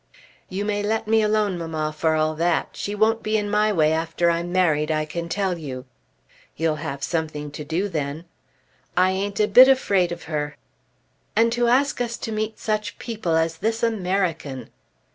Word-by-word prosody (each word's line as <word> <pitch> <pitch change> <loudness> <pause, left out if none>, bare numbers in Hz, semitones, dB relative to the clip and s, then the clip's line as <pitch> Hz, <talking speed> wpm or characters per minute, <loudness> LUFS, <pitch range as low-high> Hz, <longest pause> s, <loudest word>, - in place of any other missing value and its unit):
"You 195 +2 -3
may 205 -1 -1
let 220 +1 -1
me 220 0 +4
alone, 210 -3 +1
mamma, 155 -2 -3
for 160 0 +1
all 155 0 +1
that. 170 +1 0
She 205 - -4
won't 220 +2 +2
be 215 0 0
in 205 -1 -2
my 210 +1 +3
way 155 -5 +3
after 165 +1 +1
I'm 170 +1 -2
married, 160 -5 +2
I 155 -1 0
can 170 +2 -5
tell 190 -2 -1
you." 130 -4 -6 0.7
"You'll 160 -1 0
have 145 -3 -5
something 155 -3 -3
to 150 - -7
do 165 +7 -1
then." 155 -2 -4 0.7
"I 185 +1 +4
ain't 200 +2 -2
a 210 - +4
bit 250 +5 +9
afraid 200 -10 +3
of 175 - -6
her." 150 -2 -3 0.8
"And 230 +1 +4
to 240 0 +1
ask 260 +2 +2
us 235 -1 -2
to 225 - -5
meet 215 0 -2
such 215 -1 -2
people 220 -8 -2
as 160 0 +1
this 225 +5 -1
American!" 185 - -1
180 Hz, 180 wpm, -23 LUFS, 160-215 Hz, 0.8 s, bit